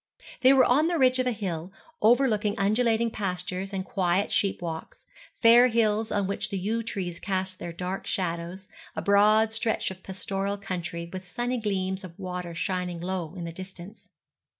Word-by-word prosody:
They 260 Hz, -, +7 dB
were 265 Hz, -2 st, +6 dB
on 295 Hz, +6 st, +4 dB
the 345 Hz, -1 st, +1 dB
ridge 255 Hz, -2 st, +4 dB
of 255 Hz, -, +1 dB
a -, -, +2 dB
hill, 185 Hz, -5 st, -4 dB, 0.3 s
overlooking 220 Hz, -2 st, +3 dB
undulating 225 Hz, +2 st, +2 dB
pastures 185 Hz, -1 st, -3 dB
and 190 Hz, -1 st, -3 dB
quiet 185 Hz, 0 st, +1 dB
sheep 205 Hz, -4 st, +1 dB
walks, 165 Hz, -2 st, -6 dB, 0.3 s
fair 235 Hz, +2 st, +7 dB
hills 220 Hz, -2 st, +1 dB
on 205 Hz, -1 st, +1 dB
which 200 Hz, +1 st, -2 dB
the 200 Hz, -, -2 dB
yew 215 Hz, +5 st, -1 dB
trees 190 Hz, -6 st, -4 dB
cast 190 Hz, -1 st, -2 dB
their 170 Hz, -, -5 dB
dark 180 Hz, +3 st, -4 dB
shadows, 175 Hz, +1 st, -3 dB, 0.3 s
a -, -, -2 dB
broad 215 Hz, +2 st, +4 dB
stretch 225 Hz, -3 st, 0 dB
of 185 Hz, 0 st, -10 dB
pastoral 195 Hz, +1 st, -3 dB
country 175 Hz, -4 st, -4 dB
with 185 Hz, -1 st, -6 dB
sunny 240 Hz, +6 st, -2 dB
gleams 190 Hz, -2 st, -2 dB
of 170 Hz, -2 st, -10 dB
water 180 Hz, -3 st, -5 dB
shining 180 Hz, 0 st, -2 dB
low 180 Hz, -1 st, -3 dB
in 175 Hz, -, -5 dB
the 165 Hz, -1 st, -5 dB
distance. 185 Hz, +1 st, -9 dB
195 Hz, 175 wpm, -27 LUFS, 180-220 Hz, 0.3 s, They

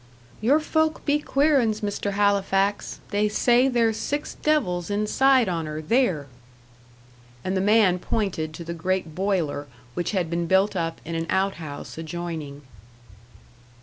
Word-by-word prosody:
"Your 270 Hz, +8 st, +4 dB
folk 315 Hz, 0 st, 0 dB
be 290 Hz, 0 st, +2 dB
queer 290 Hz, 0 st, +3 dB
'uns, 220 Hz, -2 st, -1 dB
Mr. 205 Hz, -1 st, -2 dB
Halifax. 200 Hz, 0 st, +1 dB
They 210 Hz, +1 st, +1 dB
say 245 Hz, +4 st, +3 dB
there's 230 Hz, -4 st, +2 dB
six 290 Hz, +6 st, -3 dB
devils 195 Hz, -, 0 dB
inside 230 Hz, +5 st, +3 dB
on 165 Hz, -3 st, -2 dB
her, 155 Hz, 0 st, -4 dB
theer." 175 Hz, -, +1 dB, 1.2 s
And 185 Hz, -, -1 dB
the 190 Hz, -, +1 dB
man 205 Hz, -3 st, +4 dB
pointed 175 Hz, -7 st, -2 dB
to 170 Hz, -, -7 dB
the 170 Hz, +1 st, -5 dB
great 170 Hz, -1 st, -2 dB
boiler 175 Hz, -6 st, -1 dB, 0.3 s
which 175 Hz, -, -2 dB
had 185 Hz, -5 st, 0 dB
been 170 Hz, +1 st, -2 dB
built 190 Hz, +3 st, +3 dB
up 165 Hz, -2 st, -2 dB
in 165 Hz, -, -5 dB
an 165 Hz, 0 st, -2 dB
out 190 Hz, +1 st, +1 dB
house 150 Hz, +1 st, -7 dB
adjoining. 160 Hz, -3 st, -6 dB
195 Hz, 150 wpm, -24 LUFS, 170-225 Hz, 1.2 s, Your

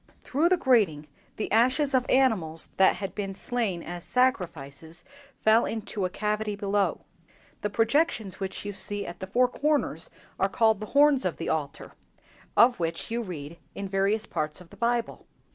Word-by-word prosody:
"Through 305 Hz, +6 st, +1 dB
the 370 Hz, -, +4 dB
grating 205 Hz, -, +2 dB, 0.3 s
the 215 Hz, -, -4 dB
ashes 255 Hz, +6 st, +3 dB
of 255 Hz, -1 st, +2 dB
animals 200 Hz, -12 st, +2 dB
that 190 Hz, -, +5 dB
had 195 Hz, -2 st, -5 dB
been 195 Hz, -2 st, -4 dB
slain 205 Hz, -6 st, -2 dB
as 175 Hz, -1 st, -7 dB
sacrifices 165 Hz, -, -1 dB, 0.4 s
fell 220 Hz, +2 st, +5 dB
into 215 Hz, -3 st, -3 dB
a -, -, -1 dB
cavity 210 Hz, +2 st, -2 dB
below. 200 Hz, 0 st, 0 dB, 0.6 s
The 210 Hz, -, -1 dB
projections 225 Hz, -, +1 dB
which 195 Hz, 0 st, -4 dB
you 205 Hz, -, -4 dB
see 205 Hz, +1 st, -3 dB
at 175 Hz, -, -8 dB
the 190 Hz, -, -6 dB
four 250 Hz, +6 st, +3 dB
corners 295 Hz, +4 st, -1 dB, 0.3 s
are -, -, +2 dB
called 220 Hz, -3 st, +3 dB
the 215 Hz, -, -6 dB
horns 290 Hz, -2 st, +5 dB
of -, -, -2 dB
the -, -, -4 dB
altar, -, -, -3 dB, 0.7 s
of 240 Hz, -2 st, +6 dB
which 165 Hz, +5 st, -2 dB
you 235 Hz, +1 st, -1 dB
read 170 Hz, -6 st, -7 dB, 0.2 s
in 200 Hz, -, -4 dB
various 195 Hz, +3 st, +1 dB
parts 150 Hz, 0 st, -3 dB
of 180 Hz, -2 st, -15 dB
the -, -, -13 dB
Bible." 235 Hz, 0 st, -1 dB
210 Hz, 170 wpm, -27 LUFS, 185-245 Hz, 0.7 s, of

